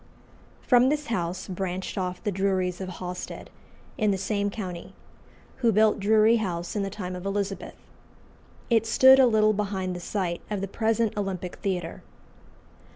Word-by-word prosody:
From 250 0 +5
this 295 0 -1
house 175 -2 -3
branched 185 0 -4
off 180 -2 -3
the 210 - 0
Druries 190 -1 0
of 185 - -4
Hawstead, 180 0 -7 0.5
in 215 -2 +2
the 195 - +1
same 200 +1 -1
county, 185 -5 -7 0.6
who 235 -3 +3
built 215 +1 +3
Drury 220 +3 +4
House 175 -5 -3
in 205 - 0
the 195 - -2
time 185 -2 -6
of 180 - -7
Elizabeth. 195 -1 -3 1.0
It 225 -1 +3
stood 260 +4 +7
a 260 - +7
little 215 -2 +4
behind 195 -3 -2
the - - -5
site 175 -1 -3
of 210 -2 -2
the 195 - -3
present 225 +2 0
Olympic 190 -3 -4
Theatre. 180 -4 -3
195 Hz, 155 wpm, -26 LUFS, 185-215 Hz, 1.0 s, stood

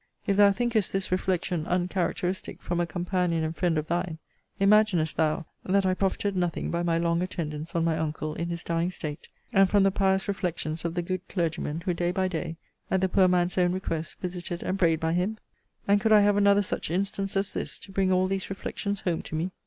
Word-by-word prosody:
If 200 - +2
thou 200 0 +7
thinkest 225 -1 +1
this 195 -1 -2
reflection 180 -3 0
uncharacteristic 180 0 -1
from 175 0 -2
a 175 - +1
companion 175 -1 0
and 160 +1 -2
friend 170 -2 +1
of 155 - -1
thine, 170 0 -2 0.4
imaginest 195 -5 +4
thou, 160 +1 +1 0.2
that 195 +1 +2
I 185 - +3
profited 195 +1 -1
nothing 175 -2 -1
by 170 - 0
my 170 -1 +1
long 170 0 +1
attendance 160 -3 -4
on 165 - +2
my 165 -1 +2
uncle 155 -1 -2
in 170 +2 -3
his 170 -1 -4
dying 170 +1 0
state; 150 -5 -6 0.3
and 195 -1 +5
from 200 0 +4
the 195 - +4
pious 190 0 +1
reflections 170 -5 -2
of 170 0 -2
the 175 - 0
good 185 +1 -2
clergyman, 165 -3 -2
who, 180 - +1
day 175 +1 0
by 185 +1 0
day, 165 -2 -4 0.3
at 190 - +2
the 190 - +2
poor 185 0 +4
man's 180 0 +2
own 180 0 +3
request, 165 -4 -3
visited 175 -1 -4
and 190 +1 -2
prayed 165 -3 +3
by 160 0 0
him? 185 +5 0 0.5
And 200 0 +4
could 220 - +2
I 210 -1 +8
have 205 0 +4
another 200 0 +4
such 185 - -3
instance, 195 +2 -1
as 195 0 0
this, - - -2
to 195 - -12
bring 190 -1 +1
all 185 0 +3
these 190 0 -2
reflections 200 +1 -3
home 175 -3 -1
to - - -7
me? 170 +4 -1
180 Hz, 215 wpm, -27 LUFS, 170-195 Hz, 0.5 s, I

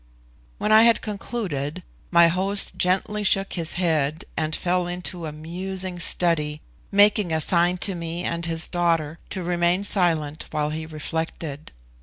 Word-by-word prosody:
When 210 - -1
I 215 0 +8
had 230 0 +4
concluded, 185 - -4 0.3
my 170 -1 +6
host 190 +4 +1
gently 195 +3 +1
shook 195 -1 +2
his 170 -2 -2
head, 160 -4 0
and 155 -1 -1
fell 180 0 0
into 175 -1 -5
a - - -5
musing 180 +4 -5
study, 155 -4 +1 0.3
making 205 -2 +4
a 160 - +1
sign 175 +3 +2
to 195 - -2
me 170 0 -5
and 170 -1 -2
his 165 0 0
daughter 165 -3 0
to 185 - -4
remain 175 +2 +1
silent 165 -6 +1
while 150 0 -1
he 160 +1 -5
reflected. 155 -1 -5
175 Hz, 150 wpm, -23 LUFS, 160-185 Hz, 0.3 s, I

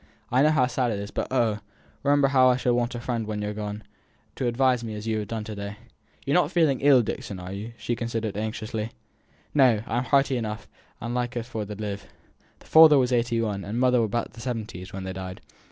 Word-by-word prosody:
"I 125 +2 +4
know 150 - +5
how 145 -5 +3
sad 125 0 0
it 105 - -1
is, 100 +1 -6
but, - - -2
oh! 115 -5 +1 0.4
remember 140 -1 +3
how 130 -2 +5
I 125 - +4
shall 125 -1 +1
want 120 +1 0
a - - -4
friend 120 -3 -3
when 105 -1 -3
you're 105 0 -3
gone, 105 0 -5 0.5
to 125 - -1
advise 125 0 +2
me 110 -2 -5
as 105 +1 -7
you 110 -1 0
have 105 - -4
done 110 +1 -4
to 110 0 -6
day. 100 0 -6 0.5
You're 140 - 0
not 175 -4 +4
feeling 160 -7 +3
ill, 135 -3 +6
Dixon, 100 -2 -5
are 90 +1 -7
you?" 105 +4 -6
she 120 - -2
continued, 115 -3 -3
anxiously. 110 +1 -4 0.6
"No! 125 -7 +4
I'm 120 +2 -1
hearty 135 -1 +3
enough, 110 -2 -4 0.3
and 115 +1 -4
likely 120 -1 -2
for 110 -3 -5
t' 105 - -6
live. 100 -1 -5 0.5
Father 160 -2 +7
was 125 -1 +2
eighty 120 -1 +1
one, 100 -3 -2
and 110 +4 -3
mother 125 -1 +4
above 115 +1 -2
the 115 - -11
seventies, 110 -7 -5
when 95 0 -6
they 95 0 -4
died. 95 -1 -7
115 Hz, 220 wpm, -26 LUFS, 105-125 Hz, 0.6 s, Father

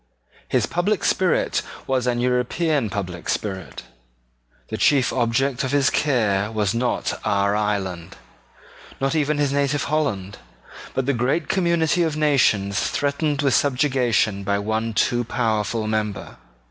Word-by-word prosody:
His - - +1
public 190 +4 -1
spirit 185 -3 +1 0.2
was 130 -2 0
an 120 -1 +1
European 125 +2 0
public 90 -4 -5
spirit. 95 -4 -4 0.9
The - - -3
chief 135 -4 +3
object 125 +2 0
of 130 - -1
his 140 -2 +3
care 110 -8 +1
was 105 -2 0
not 120 +1 -1
our 100 0 +1
island, 95 -5 -2 0.8
not 135 +2 0
even 150 -1 +1
his 145 -2 +1
native 140 0 +1
Holland, 115 -11 -2 0.6
but 130 - 0
the 140 - +1
great 135 +6 0
community 170 -2 +2
of 160 -2 0
nations 110 -10 +2
threatened 145 0 -1
with 135 -2 +2
subjugation 125 -7 +1
by 100 +1 0
one 110 +2 -2
too 120 +4 +2
powerful 110 -2 -1
member. 110 -2 -3
125 Hz, 135 wpm, -22 LUFS, 105-145 Hz, 0.9 s, chief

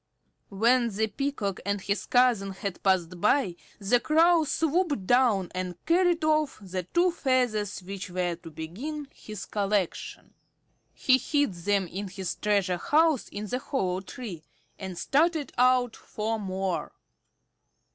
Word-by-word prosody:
When 235 +4 +3
the 220 +1 0
Peacock 220 -4 -3
and 200 +1 -1
his 200 +2 -2
cousin 240 -6 +3
had 190 -1 -5
passed 180 -2 +1
by, 210 -4 +2 0.2
the 210 +4 +2
Crow 325 +5 +4
swooped 305 - 0
down 230 -6 +3
and 185 -1 -3
carried 345 -1 +3
off 310 -2 +2
the 190 -2 -4
two 345 - +2
feathers 240 - 0
which 195 +1 -6
were 180 -1 -1
to 170 -1 -11
begin 235 - -6
his 215 -2 -8
collection. 200 -3 -2 0.6
He 260 -1 +3
hid 290 -4 +1
them 195 +3 0
in 195 +4 -5
his 190 -1 -4
treasure 200 -4 +1
house 310 - +3
in 205 +1 -5
the 250 +5 -2
hollow 190 -10 -2
tree, 195 -4 -8 0.4
and 190 -2 -6
started 310 - +1
out 250 -1 +3
for 220 +1 -3
more. 190 -2 -3
210 Hz, 135 wpm, -27 LUFS, 190-275 Hz, 0.6 s, Crow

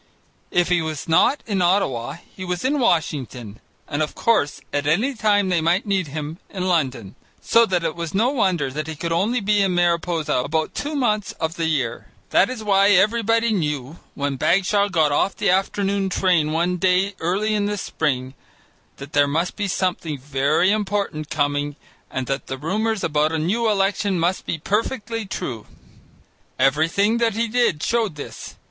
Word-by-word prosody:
If 175 0 +1
he 175 -2 +3
was 155 -2 -4
not 165 - +3
in 200 -4 -1
Ottawa, 150 -9 +1 0.2
he 185 - -7
was 180 +3 -3
in 285 +2 +1
Washington, 135 - -1 0.3
and 145 - -2
of 150 - -2
course 220 -11 +1
at 145 0 -1
any 215 - +2
time 205 -4 +2
they 175 -3 +2
might 175 +7 +1
need 195 -4 0
him 150 +3 -6
in 185 -2 -3
London, 130 - -1 0.3
so 230 0 +4
that 180 -2 0
it 160 -2 -2
was 170 -1 -4
no 230 +6 +3
wonder 180 - 0
that 150 +3 -4
he 160 - -5
could 165 +3 -4
only 210 +9 +1
be 205 0 +2
in 190 -2 +1
Mariposa 170 -2 +1
about 155 +5 -1
two 295 +1 -3
months 215 -7 0
of 160 -1 -3
the 165 -1 -2
year. 130 -7 -2 0.2
That 190 - +4
is 250 -4 -5
why 200 -1 +4
everybody 225 +3 +3
knew, 150 -4 -2 0.2
when 140 -1 -2
Bagshaw 200 +6 +2
got 160 -5 +2
off 190 +7 +1
the - - +1
afternoon 195 +1 0
train 175 -5 +2
one 175 +3 0
day 185 +2 +2
early 195 +6 0
in 205 -1 +1
the 205 0 -2
spring, 130 -8 -2 0.6
that 140 +1 -10
there 145 0 +4
must 165 +5 -1
be 205 -1 -2
something 180 -5 -1
very 140 +7 +1
important 200 -7 -2
coming 145 -1 -1 0.3
and 130 - -3
that 135 0 -3
the 130 - -4
rumours 210 +8 -1
about 150 0 +1
a - - +1
new 215 +9 +1
election 195 -2 +1
must 175 +3 -1
be 165 - -1
perfectly 220 - -2
true. 120 - -5 0.9
Everything 165 - +2
that 230 -2 +2
he 230 +1 0
did 230 -10 +1
showed 225 -8 0
this. 145 - -8
180 Hz, 180 wpm, -22 LUFS, 150-205 Hz, 0.9 s, so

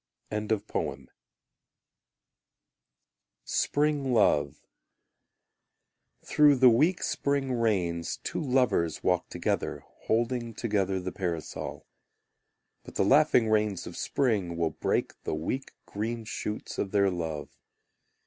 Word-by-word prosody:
Spring 145 -2 0
Love 75 - +2 1.6
Through 150 -1 +5
the 130 -1 +7
weak 155 +10 +3
spring 140 -2 0
rains 90 -8 0
Two - - -3
lovers 125 - +1
walk 90 -1 +1
together, - - -2 0.2
Holding 120 0 0
together 100 -5 0
the 90 0 -4
parasol. 85 -4 -4 1.0
But - - -12
the - - +2
laughing 135 -2 +5
rains 105 -3 +1
of - - -8
spring 105 -11 0
Will 85 -1 +1
break - - -2
the - - -3
weak 130 +13 -3
green 115 +2 -4
shoots 105 -1 -5
of 100 - -1
their 100 -1 +3
love. 80 -4 -5
110 Hz, 100 wpm, -28 LUFS, 90-130 Hz, 1.6 s, the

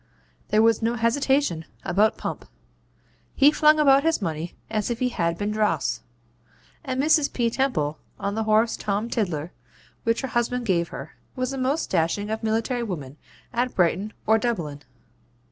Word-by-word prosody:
There 215 +1 +3
was 225 0 +3
no 230 +1 +1
hesitation 240 - +1 0.2
about 215 +4 +2
Pump. - - -5 0.9
He 285 +1 +6
flung 305 0 +4
about 275 -2 +6
his 325 +2 +1
money 165 -3 -4
as 215 0 -2
if 235 -1 -2
it 250 -1 0
had 170 -5 -1
been 205 +3 -2
dross; 210 - 0 0.8
and 260 -1 -3
Mrs. 300 0 +3
P. 235 -2 0
Temple, 190 - 0 0.2
on 200 0 -2
the 220 +1 -2
horse 220 +2 +3
Tom 210 +3 -2
Tiddler, 175 -7 -2 0.5
which 230 0 +1
her 265 - -4
husband 240 +1 -1
gave 170 -5 +1
her, - - -8 0.2
was 255 0 -2
the 270 - -4
most 275 +5 -1
dashing 190 +5 0
of 220 - -2
military 225 +3 0
women 155 - -5 0.4
at 245 +2 -1
Brighton 185 +4 +1
or 220 +1 +4
Dublin. 170 -12 -2
220 Hz, 160 wpm, -24 LUFS, 185-250 Hz, 0.9 s, He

